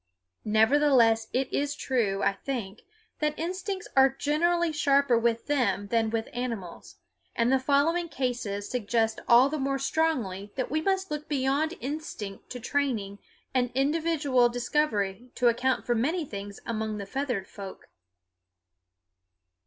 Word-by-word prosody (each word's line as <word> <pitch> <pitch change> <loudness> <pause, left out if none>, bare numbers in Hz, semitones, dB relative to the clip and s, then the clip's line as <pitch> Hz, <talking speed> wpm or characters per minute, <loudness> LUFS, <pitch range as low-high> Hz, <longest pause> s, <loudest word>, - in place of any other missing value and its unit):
Nevertheless 225 0 +4
it 260 +1 0
is 290 +1 0
true, 220 -9 0
I - - +3
think, 215 -2 -5 0.4
that 300 0 0
instincts 370 +3 -4
are 270 0 +7
generally 325 +5 +1
sharper 280 -3 +3
with 230 0 +1
them 250 -8 0
than 225 -1 +2
with 225 0 -2
animals, 230 -8 -5 0.4
and 235 +2 +2
the 265 - +4
following 310 +6 +2
cases 240 -8 -3
suggest 225 -1 0
all 245 +2 +7
the 305 +2 -3
more 275 0 0
strongly 255 -10 -1
that 255 -2 -3
we 310 +1 +1
must 385 +1 0
look 300 0 -4
beyond 280 +2 0
instinct 260 - -6
to 250 - -6
training 225 -7 -1 0.3
and 250 -2 +2
individual 285 -3 +2
discovery 240 -4 -1
to 245 -2 +4
account 250 +2 0
for 240 - +2
many 305 +9 0
things 200 -4 -7
among 220 -2 -2
the 200 - -5
feathered 245 -3 -3
folk. 195 -2 -10
255 Hz, 135 wpm, -28 LUFS, 225-295 Hz, 0.4 s, are